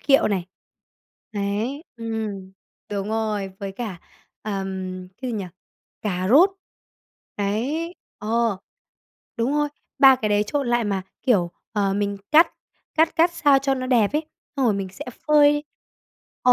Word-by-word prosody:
kiệu 275 Hz, -5 st, +4 dB
này. 185 Hz, -3 st, -1 dB, 0.9 s
Đấy, 215 Hz, -, -2 dB
ừm, 215 Hz, -4 st, -4 dB, 0.4 s
đúng 200 Hz, 0 st, -2 dB
rồi, 215 Hz, -3 st, -1 dB
với 195 Hz, -1 st, -5 dB
cả, 195 Hz, -5 st, -5 dB, 0.4 s
ờm, 190 Hz, -3 st, -4 dB
cái 255 Hz, -, -2 dB
gì 225 Hz, -, -2 dB
nhỉ? 200 Hz, -, -3 dB, 0.6 s
Cà 185 Hz, -2 st, -1 dB
rốt. 330 Hz, -, +7 dB, 0.9 s
Đấy, 260 Hz, -, -1 dB, 0.2 s
ờ, 225 Hz, -1 st, 0 dB, 0.8 s
đúng 235 Hz, +4 st, +1 dB
rồi, 295 Hz, 0 st, +2 dB, 0.3 s
3 265 Hz, -1 st, +8 dB
cái 215 Hz, -4 st, -1 dB
đấy 205 Hz, 0 st, +3 dB
trộn 280 Hz, +2 st, -1 dB
lại 240 Hz, -1 st, +2 dB
mà, 195 Hz, -2 st, -1 dB, 0.2 s
kiểu, 190 Hz, -9 st, +3 dB, 0.2 s
ờ, 200 Hz, -3 st, +1 dB
mình 200 Hz, 0 st, -1 dB
cắt 320 Hz, +3 st, +7 dB, 0.5 s
cắt 320 Hz, +1 st, +3 dB
cắt 340 Hz, +2 st, +4 dB
sao 290 Hz, -5 st, +4 dB
cho 270 Hz, 0 st, +1 dB
nó 255 Hz, -1 st, -3 dB
đẹp 235 Hz, -4 st, +3 dB
ấy, 305 Hz, +1 st, 0 dB, 0.3 s
xong 270 Hz, -, +1 dB
rồi 210 Hz, -, +3 dB
mình 195 Hz, -1 st, -3 dB
sẽ -, -, -8 dB, 0.2 s
phơi 295 Hz, 0 st, +5 dB, 0.8 s
ờ, 250 Hz, -, +6 dB
220 Hz, 150 wpm, -23 LUFS, 200-275 Hz, 0.9 s, 3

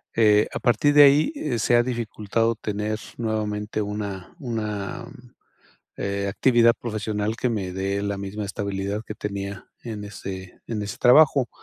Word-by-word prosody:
eh, 105 Hz, -2 st, +5 dB
a -, -, -3 dB
partir 125 Hz, +5 st, +3 dB
de 145 Hz, 0 st, +9 dB
ahí 145 Hz, -, +3 dB
se 120 Hz, +2 st, +3 dB
ha 120 Hz, -, +5 dB
dificultado 115 Hz, -2 st, -1 dB
tener 105 Hz, 0 st, -3 dB, 0.2 s
nuevamente 110 Hz, -2 st, -2 dB
una 100 Hz, -3 st, -5 dB
una, 110 Hz, -, -4 dB, 0.9 s
eh, 100 Hz, 0 st, -2 dB
actividad 115 Hz, +2 st, +4 dB
profesional 110 Hz, -1 st, -3 dB
que 125 Hz, -, -1 dB
me 100 Hz, -5 st, -3 dB
dé 100 Hz, +1 st, -1 dB
la 100 Hz, -1 st, -2 dB
misma 100 Hz, +2 st, -5 dB
estabilidad 100 Hz, +1 st, -3 dB
que 105 Hz, -, -7 dB
tenía 100 Hz, -1 st, -5 dB, 0.2 s
en 110 Hz, -3 st, -6 dB
ese 95 Hz, -2 st, -8 dB
en 110 Hz, -3 st, -3 dB
ese 100 Hz, 0 st, -6 dB
trabajo. 135 Hz, 0 st, +5 dB
105 Hz, 145 wpm, -24 LUFS, 100-115 Hz, 0.9 s, de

